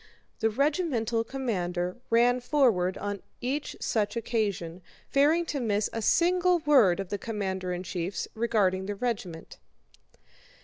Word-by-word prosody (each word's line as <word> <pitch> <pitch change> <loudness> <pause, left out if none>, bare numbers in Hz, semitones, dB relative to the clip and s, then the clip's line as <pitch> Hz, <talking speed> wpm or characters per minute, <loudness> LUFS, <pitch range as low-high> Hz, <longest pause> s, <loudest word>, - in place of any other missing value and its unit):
The 225 - +2
regimental 245 - 0
commander 180 -9 -2
ran 240 +2 +4
forward 235 -9 +2
on 205 -1 -4 0.2
each 270 +4 -3
such 210 0 -1
occasion, 200 -7 -2 0.3
fearing 305 +5 +3
to 295 -3 -3
miss 210 -4 0
a 225 - -2
single 360 - +3
word 265 - +4
of 195 -2 -4
the 205 - -3
commander 190 -4 -3
in 180 0 -3
chief's 180 +1 -3
regarding 200 -5 +1
the 205 - -3
regiment. 195 -8 -4
220 Hz, 130 wpm, -28 LUFS, 190-260 Hz, 0.3 s, ran